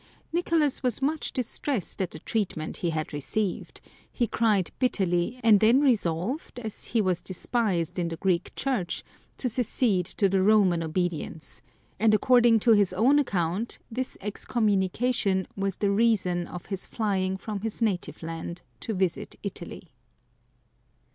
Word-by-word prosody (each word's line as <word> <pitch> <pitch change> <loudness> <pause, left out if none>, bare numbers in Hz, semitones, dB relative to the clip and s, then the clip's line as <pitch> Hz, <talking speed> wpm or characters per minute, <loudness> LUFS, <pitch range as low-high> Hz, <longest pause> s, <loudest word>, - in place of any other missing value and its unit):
Nicolas 330 -4 +1
was 250 -4 0
much 295 +3 -1
distressed 250 - -3
at 185 - -1
the - - -9
treatment 190 -8 -3
he 175 - -1
had 155 -1 -3
received; 185 +7 -3 0.3
he 245 - +1
cried 215 -5 +1
bitterly, 195 -2 +1
and 220 -3 +7
then 230 +5 +5
resolved, 230 - 0
as 220 -3 -4
he 225 - +1
was 180 -2 0
despised 185 -3 -1
in 170 - 0
the 165 -1 -4
Greek 180 0 0
Church, 245 -11 -1 0.3
to 255 - -1
secede 225 -6 +1
to 200 - +2
the 190 0 +2
Roman 190 -4 +4
obedience; 165 -1 -3 0.4
and 215 0 +5
according 240 0 +5
to 235 - +4
his 205 -4 +4
own 255 +10 +4
account 195 - -1
this 255 +3 -4
excommunication 205 -1 0
was 195 -1 -1
the 200 -1 +1
reason 200 -5 +2
of 180 - -8
his 195 -2 -5
flying 190 -4 -1
from 205 +1 -5
his 220 +1 -4
native 205 -7 -1
land 165 +1 -6 0.2
to 220 - -3
■ - - -4
visit 185 -3 -1
Italy. - - -7
200 Hz, 150 wpm, -27 LUFS, 180-235 Hz, 0.4 s, and